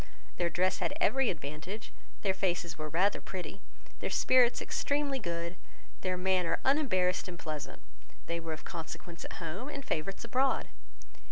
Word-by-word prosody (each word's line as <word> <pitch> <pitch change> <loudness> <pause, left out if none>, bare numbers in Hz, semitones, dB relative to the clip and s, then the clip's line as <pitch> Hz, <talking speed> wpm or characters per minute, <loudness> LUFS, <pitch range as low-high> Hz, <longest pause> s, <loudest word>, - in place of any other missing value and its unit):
Their 175 -1 +2
dress 185 +2 +2
had 290 - 0
every 270 -2 +4
advantage, 155 +7 -5 0.3
their 195 -2 +3
faces 175 -3 0
were 155 -1 -4
rather 185 +6 +3
pretty, 190 +1 -5 0.4
their - - -1
spirits 250 -2 +5
extremely 285 -1 0
good, 170 -3 -3 0.4
their 185 -1 0
manner 180 -2 +2
unembarrassed 200 - +3
and 180 -1 -6
pleasant; 155 -3 -5 0.4
they 170 0 -1
were 165 -1 -3
of 155 - -8
consequence 170 +1 -6
at - - -6
home, 180 - -4
and 280 -2 -5
favourites 190 +7 -1
abroad. 260 +3 +2
185 Hz, 150 wpm, -32 LUFS, 170-230 Hz, 0.4 s, spirits